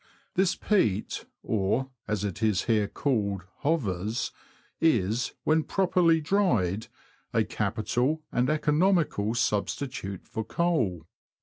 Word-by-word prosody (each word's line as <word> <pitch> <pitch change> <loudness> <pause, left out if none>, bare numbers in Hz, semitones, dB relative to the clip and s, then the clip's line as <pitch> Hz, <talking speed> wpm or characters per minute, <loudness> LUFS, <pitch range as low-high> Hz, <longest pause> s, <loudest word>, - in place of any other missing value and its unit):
This 185 -1 +2
peat, 110 - 0 0.2
or, 110 +6 0 0.2
as 105 -2 -1
it 100 +1 -3
is 105 -4 +2
here 110 -3 +2
called, 100 -7 -1
'^ - - -22
hovers," 115 - -1 0.5
is, 120 - +2
when 155 +1 +3
properly 175 -2 +3
dried, 120 - +1 0.5
a - - +3
capital 120 +8 -1
and 125 +2 +1
economical 150 - +2
substitute 105 -3 -2
for 110 - -3
coal. 115 - 0
120 Hz, 110 wpm, -28 LUFS, 100-160 Hz, 0.5 s, when